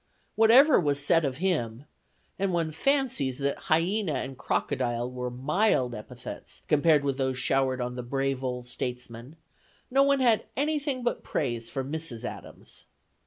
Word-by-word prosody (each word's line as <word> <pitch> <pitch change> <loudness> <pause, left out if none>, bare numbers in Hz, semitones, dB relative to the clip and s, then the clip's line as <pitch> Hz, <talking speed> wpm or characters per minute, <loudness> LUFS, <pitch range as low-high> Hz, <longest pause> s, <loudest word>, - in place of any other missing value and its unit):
Whatever 250 +7 +7
was 145 -3 +1
said 160 +3 +3
of 135 -3 -2
him 145 -9 -1 0.5
and 195 -1 +1
one 165 -2 0
fancies 160 - 0
that 140 0 -1
"hyena" 175 +3 +2
and 130 +1 -4
"crocodile" 120 -1 -1
were 125 0 -4
mild 130 - +1
epithets 120 +3 -9
compared 150 -1 +4
with 140 -1 -1
those 130 -1 0
showered 130 0 +1
on 125 0 -3
the 125 - -4
brave 135 +1 -2
old 125 -1 -3
statesman, 125 +2 -5 0.6
no 270 +2 +4
one 280 0 +4
had 235 -4 +3
anything 285 -3 -1
but 240 - -1
praise 120 -5 -2
for 135 - -3
Mrs. 140 -4 -3
Adams. - - -9
140 Hz, 150 wpm, -27 LUFS, 125-190 Hz, 0.6 s, Whatever